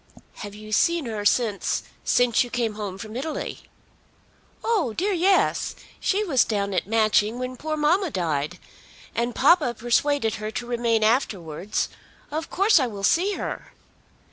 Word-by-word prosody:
"Have 205 -1 -8
you 215 0 -10
seen 335 +8 +2
her 215 -3 -4
since, 215 -2 +1 0.2
since 245 -1 +3
you 245 - -8
came 235 -3 -1
home 205 -3 -5
from 215 +2 -8
Italy?" 300 +5 -4 1.0
"Oh 400 - +1
dear, 390 - 0
yes! 375 +2 +2 0.2
She 405 +2 +1
was 285 - +3
down 200 -2 -1
at 180 - -1
Matching 215 0 +2
when 255 0 -4
poor 310 +4 -3
mamma 340 +5 +2
died. 165 - -2 0.6
And 235 +1 -1
papa 290 -4 +4
persuaded 240 +1 +1
her 215 - -3
to 240 - -4
remain 235 -2 +1
afterwards. 200 - 0 0.4
Of 315 +2 -3
course 395 0 +4
I 260 - +1
will 205 -4 -7
see 370 - +3
her." - - -5
240 Hz, 150 wpm, -24 LUFS, 210-310 Hz, 1.0 s, papa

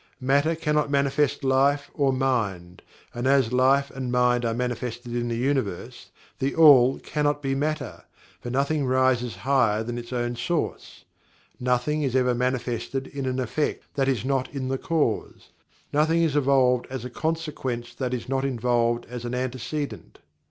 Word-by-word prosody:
Matter 140 +5 +2
cannot 150 -2 0
manifest 140 0 +1
Life 140 +2 +2
or 140 -2 +2
Mind, 105 -10 -1 0.3
and 120 +2 -2
as 135 -3 +3
Life 135 +2 +3
and 130 -2 -4
Mind 125 0 +2
are 115 - 0
manifested 120 0 -4
in 120 0 -1
the 115 -1 -2
Universe, 125 -8 -2 0.3
THE 135 +1 -1
ALL 135 -5 +7
cannot 145 -1 -1
be 135 0 0
Matter, 155 +3 -3 0.3
for 120 - -7
nothing 140 +2 0
rises 130 -2 +2
higher 120 -6 +2
than 120 +1 -4
its 120 +1 -10
own 120 -1 -2
source 155 +7 -3 0.5
nothing 125 +5 0
is 135 -3 -1
ever 125 -1 +3
manifested 125 +1 -2
in 140 -1 -5
an 130 0 -1
effect 130 +4 -2
that 135 -1 0
is 130 -4 0
not 135 -1 -1
in 130 -2 -4
the 135 0 -1
cause 160 - -2 0.4
nothing 160 +3 +3
is 155 -3 +1
evolved 130 -3 +3
as 130 -2 -5
a - - -5
consequent 135 -6 -3
that 130 -2 -1
is 125 -2 -4
not 135 0 -1
involved 120 -2 0
as 125 0 -7
an 120 +1 -3
antecedent. 130 +3 -4
130 Hz, 160 wpm, -25 LUFS, 120-140 Hz, 0.5 s, ALL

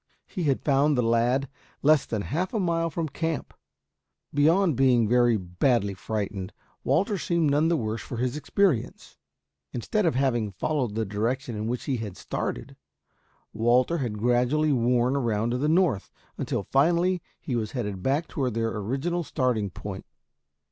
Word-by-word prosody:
He 180 -5 -4
had 135 -3 +1
found 145 0 +3
the 125 - +2
lad 120 +4 +2 0.4
less 150 0 +4
than 110 -3 -2
half 180 - -2
a - - +1
mile 165 -2 0
from 165 +1 -2
camp. 160 +1 -3 0.8
Beyond 160 +3 +3
being 125 -3 +4
very 120 0 +4
badly 100 +3 0
frightened, 100 -1 -4 0.3
Walter 195 +3 +1
seemed 170 -4 +1
none 150 +3 +3
the 170 0 +2
worse 110 -2 -3
for 120 - -7
his 125 +2 -1
experience. 155 - 0 0.6
Instead 180 - 0
of 160 - +1
having 120 -6 0
followed 125 -1 -1
the 110 0 0
direction 115 +5 -2
in 105 +1 -3
which 125 +1 -2
he 135 -3 -1
had 105 -5 -6
started, - - -4 0.8
Walter 125 +8 +2
had 115 -6 -3
gradually 125 +7 +2
worn 125 +1 +2
around 115 -4 0
to 125 - -1
the 150 +3 +1
north 160 - +2 0.3
until - - -2
finally 170 - +2 0.2
he 130 - -3
was 110 -3 -2
headed 105 -7 -3
back 145 - 0
toward 130 -6 -2
their 115 0 -1
original 135 - -2
starting 125 -9 0
point. 95 +2 -8
125 Hz, 160 wpm, -26 LUFS, 115-155 Hz, 0.8 s, less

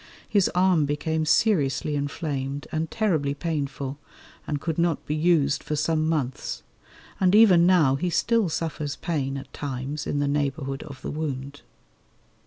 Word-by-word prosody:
His 200 -3 +3
arm 180 -4 +4
became 155 +2 -1
seriously 150 - +2
inflamed 145 -1 -3
and 160 0 -2
terribly 160 -11 0
painful, 140 -3 -3 0.5
and 145 -1 -1
could 165 +2 -3
not 170 -2 +1
be 150 - -2
used 155 -3 +2
for 150 - -2
some 155 +1 +1
months; 140 -6 -2 0.6
and 185 +1 +4
even 185 -6 +7
now 165 -8 +5
he 180 +4 -1
still 225 +3 +2
suffers 155 -3 -3
pain 140 -5 -2
at 135 0 -10
times 140 +1 -4
in - - -1
the 145 0 +1
neighbourhood 140 -1 -1
of 140 -4 -10
the - - -3
wound. 145 -2 -4
150 Hz, 150 wpm, -25 LUFS, 140-165 Hz, 0.6 s, even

